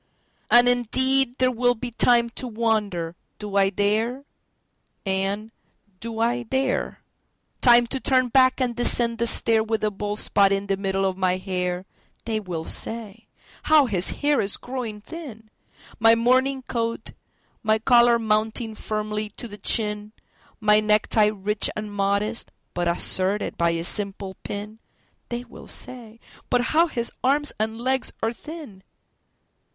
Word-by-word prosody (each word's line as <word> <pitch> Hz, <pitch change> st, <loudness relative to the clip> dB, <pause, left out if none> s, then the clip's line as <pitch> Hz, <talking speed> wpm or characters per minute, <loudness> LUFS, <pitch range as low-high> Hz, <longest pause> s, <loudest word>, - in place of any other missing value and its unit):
And 240 Hz, +1 st, +6 dB
indeed 260 Hz, +2 st, +2 dB
there 255 Hz, 0 st, +2 dB
will 245 Hz, 0 st, +2 dB
be 245 Hz, +1 st, -6 dB
timeTo 240 Hz, +1 st, +2 dB
wonder, 210 Hz, -7 st, -1 dB, 0.2 s
"Do 210 Hz, -1 st, -7 dB
I 195 Hz, -1 st, +4 dB
dare?" 220 Hz, +7 st, -1 dB, 0.8 s
and, 195 Hz, +3 st, -2 dB, 0.5 s
"Do 230 Hz, +1 st, -6 dB
I 240 Hz, +2 st, +1 dB
dare?"Time 245 Hz, -1 st, 0 dB
to 265 Hz, +3 st, -4 dB
turn 255 Hz, -1 st, +2 dB
back 255 Hz, +2 st, +4 dB
and 245 Hz, -2 st, 0 dB
descend 235 Hz, -1 st, +1 dB
the 235 Hz, -, +2 dB
stair, 225 Hz, -1 st, +4 dB
With 220 Hz, 0 st, -2 dB
a 215 Hz, -, +1 dB
bald 205 Hz, +1 st, -4 dB
spot 200 Hz, -2 st, +2 dB
in 195 Hz, 0 st, 0 dB
the 195 Hz, -1 st, 0 dB
middle 195 Hz, 0 st, -1 dB
of 190 Hz, -1 st, -1 dB
my 185 Hz, -1 st, +1 dB
hair—(They 185 Hz, +4 st, -5 dB
will 175 Hz, -6 st, -5 dB
say: 225 Hz, +3 st, -3 dB, 0.4 s
"How 305 Hz, -2 st, +6 dB
his 190 Hz, -6 st, +1 dB
hair 290 Hz, -1 st, +1 dB
is 200 Hz, 0 st, -2 dB
growing 245 Hz, -5 st, -6 dB
thin!")My 225 Hz, -4 st, -2 dB
morning 260 Hz, +3 st, +2 dB
coat, 230 Hz, -2 st, -3 dB, 0.5 s
my 215 Hz, 0 st, +2 dB
collar 235 Hz, +1 st, +5 dB
mounting 220 Hz, +1 st, -1 dB
firmly 215 Hz, 0 st, -3 dB
to 240 Hz, -, -5 dB
the 205 Hz, -1 st, -11 dB
chin, 210 Hz, 0 st, +1 dB, 0.5 s
My 210 Hz, -1 st, +4 dB
necktie 215 Hz, 0 st, +3 dB
rich 210 Hz, 0 st, -1 dB
and 210 Hz, -1 st, -5 dB
modest, 200 Hz, +3 st, -1 dB, 0.2 s
but 175 Hz, 0 st, -1 dB
asserted 185 Hz, +3 st, 0 dB
by 170 Hz, 0 st, +2 dB
a 165 Hz, 0 st, -2 dB
simple 195 Hz, 0 st, -1 dB
pin—(They 215 Hz, +3 st, -8 dB
will 245 Hz, -, -13 dB
say: 230 Hz, -3 st, -4 dB, 0.3 s
"But 245 Hz, -, +3 dB
how 330 Hz, +2 st, +5 dB
his 235 Hz, -6 st, -3 dB
arms 290 Hz, +3 st, +2 dB
and 220 Hz, +1 st, -2 dB
legs 260 Hz, +1 st, -1 dB
are 225 Hz, +1 st, +1 dB
thin!") 295 Hz, -, -10 dB
220 Hz, 140 wpm, -24 LUFS, 205-245 Hz, 0.8 s, And